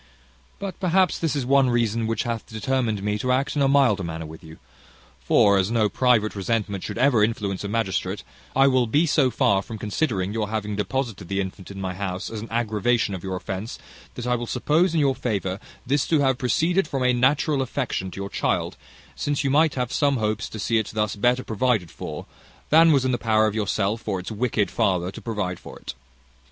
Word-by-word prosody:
"But, 195 Hz, -3 st, -6 dB
perhaps, 185 Hz, -1 st, +2 dB
this 165 Hz, -3 st, -1 dB
is 140 Hz, -3 st, -1 dB
one 135 Hz, 0 st, +4 dB
reason 115 Hz, -1 st, +1 dB
which 115 Hz, -1 st, -1 dB
hath 115 Hz, -2 st, -4 dB
determined 110 Hz, -2 st, -1 dB
me 105 Hz, 0 st, -1 dB
to 125 Hz, +4 st, 0 dB
act 135 Hz, +3 st, 0 dB
in 145 Hz, -, +1 dB
a 135 Hz, -, +4 dB
milder 135 Hz, -8 st, +3 dB
manner 80 Hz, -1 st, -5 dB
with 80 Hz, +1 st, -11 dB
you: 80 Hz, 0 st, -12 dB, 0.6 s
for, 100 Hz, -1 st, +4 dB
as 95 Hz, +1 st, +1 dB
no 110 Hz, -2 st, +2 dB
private 115 Hz, -1 st, +2 dB
resentment 100 Hz, -1 st, -2 dB
should -, -, -5 dB
ever 125 Hz, -4 st, +4 dB
influence 105 Hz, -3 st, -1 dB
a -, -, -3 dB
magistrate, 105 Hz, -3 st, -2 dB, 0.3 s
I 135 Hz, +1 st, +5 dB
will 130 Hz, -3 st, +3 dB
be 150 Hz, +9 st, +3 dB
so 145 Hz, -4 st, +3 dB
far 100 Hz, -5 st, +2 dB
from 110 Hz, +3 st, -8 dB
considering 105 Hz, -3 st, -1 dB
your 110 Hz, -2 st, -2 dB
having 105 Hz, -1 st, -3 dB
deposited 105 Hz, -2 st, -3 dB
the 100 Hz, +1 st, -2 dB
infant 95 Hz, -1 st, -5 dB
in 100 Hz, -1 st, -8 dB
my 95 Hz, -1 st, -3 dB
house 95 Hz, 0 st, -4 dB
as 110 Hz, -2 st, -5 dB
an 115 Hz, -, -8 dB
aggravation 115 Hz, -1 st, 0 dB
of 95 Hz, -, -6 dB
your 95 Hz, -1 st, -3 dB
offence, 95 Hz, +4 st, -5 dB, 0.4 s
that 125 Hz, -, -5 dB
I 125 Hz, -, +1 dB
will 120 Hz, 0 st, -4 dB
suppose, 160 Hz, +8 st, +1 dB
in -, -, +3 dB
your 140 Hz, -2 st, +3 dB
favour, 100 Hz, -6 st, -2 dB, 0.3 s
this 140 Hz, +2 st, +1 dB
to 160 Hz, -, +3 dB
have 130 Hz, -2 st, +2 dB
proceeded 165 Hz, +8 st, +1 dB
from 135 Hz, -3 st, -2 dB
a 125 Hz, 0 st, +3 dB
natural 135 Hz, +3 st, +2 dB
affection 125 Hz, -7 st, -2 dB
to 95 Hz, -, -9 dB
your 100 Hz, -, -4 dB
child, -, -, -1 dB, 0.4 s
since 145 Hz, 0 st, -1 dB
you 135 Hz, -, +1 dB
might 155 Hz, +2 st, +3 dB
have 125 Hz, -2 st, -2 dB
some 140 Hz, -2 st, +2 dB
hopes 110 Hz, 0 st, -1 dB
to -, -, -8 dB
see 115 Hz, +1 st, +1 dB
it 110 Hz, -, -2 dB
thus 105 Hz, -1 st, 0 dB
better 125 Hz, +4 st, +2 dB
provided 110 Hz, -6 st, 0 dB
for -, -, -7 dB, 0.5 s
than 165 Hz, +2 st, +7 dB
was 135 Hz, -3 st, +3 dB
in 130 Hz, -, +2 dB
the 120 Hz, -, -1 dB
power 110 Hz, -1 st, +3 dB
of 105 Hz, -, 0 dB
yourself, 105 Hz, 0 st, -1 dB
or 95 Hz, -3 st, -1 dB
its 90 Hz, -, -7 dB
wicked 110 Hz, -2 st, 0 dB
father, 90 Hz, -1 st, 0 dB
to -, -, -10 dB
provide 105 Hz, -6 st, -3 dB
for -, -, -11 dB
it. -, -, -7 dB
115 Hz, 215 wpm, -24 LUFS, 100-130 Hz, 0.6 s, than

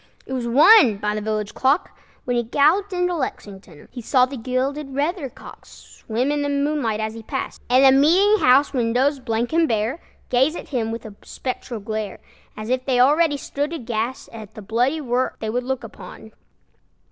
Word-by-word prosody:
It 265 Hz, -, -7 dB
was 250 Hz, -2 st, -2 dB
one 275 Hz, -, +6 dB
by 210 Hz, +1 st, -2 dB
the 215 Hz, -, -3 dB
village 215 Hz, -1 st, -3 dB
clock, 275 Hz, +6 st, +1 dB, 0.3 s
When 245 Hz, -, -1 dB
he 240 Hz, -, +2 dB
galloped 305 Hz, -, +2 dB
into 360 Hz, -1 st, 0 dB
Lexington. 195 Hz, -, -7 dB
He 245 Hz, -, -8 dB
saw 250 Hz, +2 st, +3 dB
the 270 Hz, +2 st, -8 dB
gilded 265 Hz, +3 st, -3 dB
weathercock 295 Hz, -1 st, -4 dB
Swim 245 Hz, +5 st, -4 dB
in 295 Hz, 0 st, -1 dB
the 285 Hz, -, -1 dB
moonlight 280 Hz, -6 st, -1 dB
as 220 Hz, 0 st, -3 dB
he 225 Hz, -, -9 dB
passed, 265 Hz, +5 st, -5 dB
And 255 Hz, +2 st, +5 dB
the 265 Hz, 0 st, +6 dB
meeting 390 Hz, +7 st, +4 dB
house 270 Hz, +4 st, +4 dB
windows, 255 Hz, +3 st, +1 dB
blank 235 Hz, +1 st, -2 dB
and 330 Hz, 0 st, +3 dB
bare, 225 Hz, +6 st, -1 dB, 0.3 s
Gaze 265 Hz, +6 st, +2 dB
at -, -, -8 dB
him 230 Hz, -5 st, -2 dB
with 230 Hz, 0 st, -6 dB
a 215 Hz, -, -9 dB
spectral 250 Hz, -2 st, -6 dB
glare, 215 Hz, -1 st, -4 dB, 0.4 s
As 215 Hz, +1 st, -6 dB
if 255 Hz, 0 st, 0 dB
they 255 Hz, -2 st, 0 dB
already 290 Hz, +3 st, +4 dB
stood 290 Hz, +3 st, -4 dB
aghast 240 Hz, -3 st, -4 dB
At 220 Hz, -1 st, -10 dB
the 215 Hz, -, -9 dB
bloody 245 Hz, +9 st, 0 dB
work 255 Hz, -1 st, -1 dB
they 220 Hz, -1 st, -3 dB
would 245 Hz, +2 st, -2 dB
look 265 Hz, -1 st, -3 dB
upon. 220 Hz, 0 st, -11 dB
255 Hz, 185 wpm, -21 LUFS, 225-285 Hz, 0.4 s, one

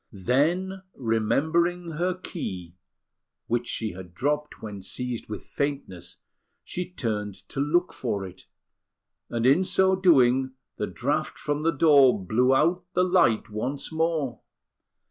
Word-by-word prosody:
Then, 160 Hz, -, 0 dB
remembering 160 Hz, +10 st, +1 dB
her 175 Hz, +3 st, -1 dB
key, 95 Hz, -, -6 dB, 0.7 s
which 120 Hz, +1 st, -1 dB
she 110 Hz, -2 st, -2 dB
had 90 Hz, -1 st, -11 dB
dropped 150 Hz, +5 st, -1 dB
when 105 Hz, -3 st, -7 dB
seized 125 Hz, +4 st, -4 dB
with 105 Hz, -, -6 dB
faintness, 115 Hz, -12 st, -4 dB, 0.5 s
she 180 Hz, 0 st, -5 dB
turned 105 Hz, -, -3 dB
to -, -, -5 dB
look 170 Hz, +6 st, +1 dB
for 105 Hz, -6 st, -3 dB
it; 90 Hz, -1 st, -12 dB, 0.8 s
and 115 Hz, 0 st, -1 dB
in 140 Hz, +8 st, +5 dB
so 190 Hz, 0 st, +3 dB
doing, 130 Hz, -8 st, +4 dB, 0.2 s
the -, -, -2 dB
draught -, -, -2 dB
from 145 Hz, 0 st, -2 dB
the 165 Hz, -, +2 dB
door 140 Hz, -5 st, +5 dB
blew 115 Hz, +7 st, +2 dB
out 175 Hz, +6 st, +2 dB
the 180 Hz, -, +3 dB
light 175 Hz, -, +3 dB
once 130 Hz, +9 st, -4 dB
more. 160 Hz, -7 st, -1 dB
135 Hz, 130 wpm, -26 LUFS, 110-170 Hz, 0.8 s, in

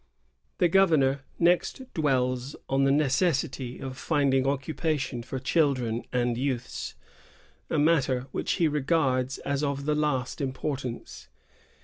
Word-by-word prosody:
The 175 Hz, -, +4 dB
governor 155 Hz, -7 st, +3 dB, 0.2 s
next 175 Hz, +9 st, +2 dB
dwells 130 Hz, -3 st, 0 dB
on 135 Hz, +1 st, +2 dB
the 135 Hz, -, +4 dB
necessity 135 Hz, -3 st, +1 dB
of 130 Hz, -1 st, -6 dB
find 145 Hz, -4 st, +1 dB
ing 135 Hz, 0 st, +2 dB
occupation 140 Hz, -1 st, -1 dB
for 130 Hz, +2 st, -5 dB
children 130 Hz, -5 st, +1 dB
and 120 Hz, -1 st, 0 dB
youths, 130 Hz, -3 st, -3 dB, 0.4 s
— -, -, -30 dB
a -, -, 0 dB
matter 145 Hz, -5 st, +3 dB
which -, -, -1 dB
he 165 Hz, -, +2 dB
regards 135 Hz, -3 st, +1 dB
as 140 Hz, +1 st, -2 dB
of 140 Hz, -1 st, -2 dB
the 150 Hz, -, +2 dB
last 150 Hz, -3 st, -1 dB
importance. 130 Hz, -2 st, -4 dB
135 Hz, 130 wpm, -27 LUFS, 130-150 Hz, 0.4 s, The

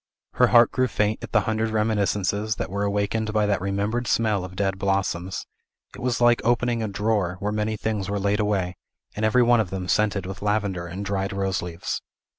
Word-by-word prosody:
Her -, -, +4 dB
heart 120 Hz, -1 st, +6 dB
grew 130 Hz, 0 st, +1 dB
faint 105 Hz, -1 st, -1 dB
at -, -, -7 dB
the 110 Hz, -, +4 dB
hundred 110 Hz, +2 st, -1 dB
reminiscences 105 Hz, -1 st, 0 dB
that 90 Hz, -, -4 dB
were 100 Hz, +1 st, -2 dB
awakened 105 Hz, +2 st, 0 dB
by 105 Hz, -1 st, +2 dB
that 100 Hz, -3 st, 0 dB
remembered 100 Hz, +5 st, -1 dB
smell 110 Hz, -4 st, +1 dB
of 90 Hz, 0 st, -8 dB
dead 95 Hz, 0 st, -1 dB
blossoms; 95 Hz, -2 st, -1 dB, 0.5 s
it -, -, -10 dB
was 125 Hz, -1 st, 0 dB
like 120 Hz, -1 st, +4 dB
opening 120 Hz, 0 st, +1 dB
a 110 Hz, -, -1 dB
drawer, 100 Hz, -3 st, 0 dB
where 105 Hz, 0 st, -1 dB
many 105 Hz, +1 st, -1 dB
things 105 Hz, -3 st, -2 dB
were 100 Hz, -, -1 dB
laid 100 Hz, +1 st, +1 dB
away, 95 Hz, -4 st, 0 dB, 0.4 s
and 105 Hz, -, -3 dB
every 110 Hz, +3 st, +4 dB
one 120 Hz, 0 st, +4 dB
of 105 Hz, -5 st, 0 dB
them 95 Hz, -1 st, -4 dB
scented 105 Hz, -1 st, +1 dB
with 95 Hz, +1 st, -7 dB
lavender 100 Hz, -4 st, -1 dB
and 95 Hz, +4 st, -6 dB
dried 95 Hz, 0 st, -1 dB
rose 95 Hz, -1 st, -1 dB
leaves. 85 Hz, -1 st, -4 dB
105 Hz, 205 wpm, -24 LUFS, 95-110 Hz, 0.5 s, heart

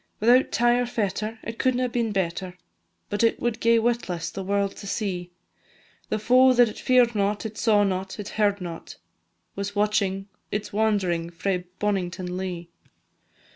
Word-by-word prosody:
Without 245 Hz, +4 st, +4 dB
tie 240 Hz, +1 st, +3 dB
or 245 Hz, -, 0 dB
fetter, 215 Hz, 0 st, -2 dB
it 230 Hz, 0 st, -7 dB
couldna 255 Hz, -1 st, +2 dB
been 235 Hz, -2 st, -1 dB
better, 185 Hz, -1 st, -2 dB, 0.5 s
But 205 Hz, +2 st, 0 dB
it 230 Hz, -, +3 dB
would 240 Hz, -2 st, -1 dB
gae 230 Hz, 0 st, +4 dB
witless 210 Hz, -8 st, -1 dB
the 195 Hz, -, -5 dB
world 200 Hz, +1 st, 0 dB
to 200 Hz, -, -8 dB
see; 185 Hz, -4 st, -3 dB, 0.8 s
The -, -, 0 dB
foe 255 Hz, +4 st, +5 dB
that 245 Hz, -1 st, +5 dB
it -, -, -9 dB
fear'd 250 Hz, -2 st, +4 dB
not, 205 Hz, +1 st, 0 dB
it 220 Hz, -1 st, -5 dB
saw 210 Hz, -2 st, +3 dB
not, 190 Hz, +1 st, -2 dB
it 205 Hz, -, -5 dB
heard 205 Hz, -2 st, +1 dB
not, 170 Hz, -2 st, -7 dB, 0.6 s
Was 200 Hz, +1 st, -4 dB
watching 200 Hz, -2 st, 0 dB, 0.2 s
its 210 Hz, 0 st, -3 dB
wand'ring 195 Hz, -6 st, +1 dB
frae 180 Hz, +1 st, -2 dB
Bonnington 185 Hz, -3 st, -2 dB
Lea. 180 Hz, -2 st, -4 dB
205 Hz, 160 wpm, -25 LUFS, 185-230 Hz, 0.8 s, foe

